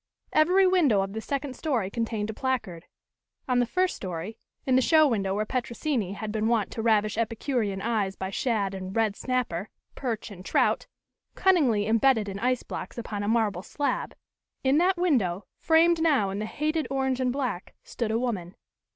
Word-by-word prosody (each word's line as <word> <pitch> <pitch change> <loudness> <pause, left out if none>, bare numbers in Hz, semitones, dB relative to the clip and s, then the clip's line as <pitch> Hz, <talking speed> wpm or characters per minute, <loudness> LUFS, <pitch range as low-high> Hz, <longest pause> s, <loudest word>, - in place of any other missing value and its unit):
Every 365 +5 +5
window 320 - +4
of 195 0 -4
the 220 - -4
second 275 +1 -3
story 240 -12 -1
contained 220 -2 -2
a - - -9
placard. 220 -9 -3 0.6
On 250 -1 +2
the 245 - +2
first 370 +6 +1
story, 185 +4 -6 0.3
in 260 - +3
the 260 - +5
show 310 +3 +5
window 195 -6 0
where 215 +1 0
Petrosini 240 -3 -2
had 215 +1 -5
been 215 0 0
wont 225 -4 +1
to 225 - -4
ravish 215 -1 +2
epicurean 225 -3 -1
eyes 210 -4 0
by 190 0 -5
shad 205 -3 0
and 190 0 -6
red 220 -3 +1
snapper, 240 -8 -2 0.2
perch 230 -5 -4
and 185 -2 -10
trout, - - +1 0.5
cunningly 275 - +3
imbedded 225 0 +3
in 195 0 -5
ice 250 +2 0
blocks - - -7
upon 215 -3 -4
a 205 - -2
marble 215 -5 +1
slab 285 +8 -2 0.5
in 270 +3 +4
that 365 +2 +3
window, 215 - +1
framed 330 +1 +4
now 275 -12 +3
in 195 - -4
the 215 - -3
hated 310 +5 -1
orange 265 -1 0
and 255 -1 +1
black, 250 -9 -3
stood 235 -3 -3
a 220 - +1
woman. 210 -7 -3
230 Hz, 180 wpm, -27 LUFS, 205-270 Hz, 0.6 s, Every